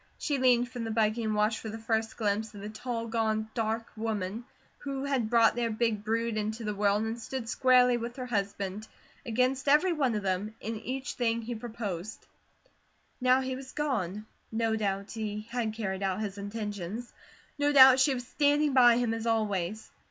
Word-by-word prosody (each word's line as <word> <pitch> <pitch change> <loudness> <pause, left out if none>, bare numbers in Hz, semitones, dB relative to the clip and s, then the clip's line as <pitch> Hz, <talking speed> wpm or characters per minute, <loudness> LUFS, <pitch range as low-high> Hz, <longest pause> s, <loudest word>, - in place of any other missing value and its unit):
She 285 -2 -1
leaned 245 -1 +4
from 240 -1 -6
the 225 - -3
buggy 220 +1 +1
and 215 -1 0
watched 210 +1 +1
for 220 - -6
the 220 - -5
first 225 0 -1
glimpse 215 0 -1
of 200 - -8
the 210 - -6
tall, 230 +1 -4
gaunt, 220 -1 -1
dark 225 0 -1
woman, 215 0 -3 0.3
who 275 -1 -4
had 260 -6 0
brought 230 -1 +5
their 240 -1 0
big 220 -2 0
brood 230 +1 -1
into 215 +2 -3
the 210 -1 -2
world 205 +1 +2
and 225 +1 -4
stood 255 0 -5
squarely 250 0 +4
with 240 +1 -5
her 255 - -5
husband, 200 -2 -3 0.4
against 255 +4 +1
every 305 +5 +5
one 270 -7 +1
of 210 - -2
them, 195 +3 -2
in 225 +1 -4
each 260 +5 -4
thing 230 -1 0
he 240 +2 -4
proposed. 220 -4 -6 1.0
Now 255 +1 +4
he 260 0 -3
was 260 0 -9
gone. 215 - -2 0.3
No 225 0 0
doubt 200 -2 -2
he 215 -2 -4
had 230 -3 -1
carried 195 -4 -3
out 195 +1 -1
his 200 -1 -4
intentions. 205 +1 -5 0.5
No 290 0 +3
doubt 265 -2 +9
she 265 0 +4
was 245 -1 -5
standing 290 +2 +2
by 240 -2 +7
him 240 -2 +1
as 225 0 -3
always. 215 -2 -1
225 Hz, 190 wpm, -29 LUFS, 215-245 Hz, 1.0 s, doubt